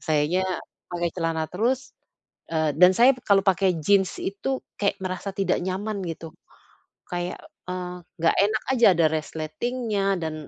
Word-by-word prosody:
Sayanya 155 +4 +1 0.5
pakai 175 0 0
celana 165 -2 -1
terus 240 +9 -1 0.6
eee, 155 -2 +1
dan 180 +3 +7
saya 250 +3 +7
kalau 200 -1 +5
pakai 185 -2 +2
jeans 190 +2 +2
itu 230 +7 -2 0.2
kayak 200 -1 +1
merasa 185 +2 -3
tidak 195 - +1
nyaman 200 +3 -3
gitu. 165 -1 -7 0.7
Kayak, 175 0 -4 0.3
eee, 180 0 -4 0.2
enggak 165 0 +4
enak 215 +2 0
aja, 235 - +5
ada 165 -1 +4
resletingnya 195 +8 -2 0.2
dan 160 -1 -2
185 Hz, 135 wpm, -25 LUFS, 165-200 Hz, 0.7 s, dan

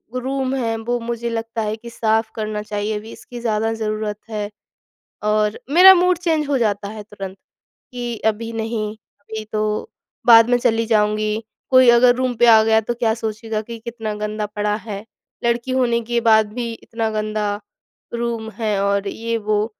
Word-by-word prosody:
Room 265 +1 -1
है, 230 -3 -1
वो 240 +2 -2
मुझे 235 0 -3
लगता 225 0 -3
है 215 0 -1
कि 235 +1 -11
साफ़ 220 -1 0
करना 215 -1 -3
चाहिए, 210 0 -3
अभी 220 +2 -9
इसकी 245 -1 -10
ज़्यादा 225 -1 0
ज़रूरत 215 -1 -3
है 210 -1 -3 0.7
और 210 0 +1
मेरा 370 +4 +10
मूड 360 0 +3
चेंज 320 -4 0
हो 275 - +2
जाता 205 -3 0
है 215 -1 -8
तुरंत, 195 -2 -8 0.5
कि 240 -2 -4
अभी 225 +1 -1
नहीं, 220 -1 -2 0.3
अभी 220 -5 -7
तो 215 - -1 0.4
बाद 230 0 +8
में 245 - +4
चली 230 -2 +1
जाऊँगी। 215 0 +1 0.3
कोई 255 -1 +7
अगर 245 +1 +6
रूम 255 -1 0
पे 240 - +4
आ 220 -1 +8
गया, 220 0 +4
तो 240 +3 -2
क्या 230 -2 +1
सोचेगा 220 -1 -3
कि 230 +1 -8
कितना 225 -2 -5
गंदा 210 0 -3
पड़ा 210 0 -1
है। 200 0 -5 0.4
लड़की 235 +2 0
होने 245 -2 +2
के 235 +1 -1
बाद 220 -2 +4
भी 235 -1 -3
इतना 225 0 -4
गंदा 215 -1 -2 0.5
रूम 235 -2 -2
है 215 -3 0
और 200 0 +1
ये 230 +2 -2
वो। 210 0 0
225 Hz, 175 wpm, -20 LUFS, 215-235 Hz, 0.7 s, मेरा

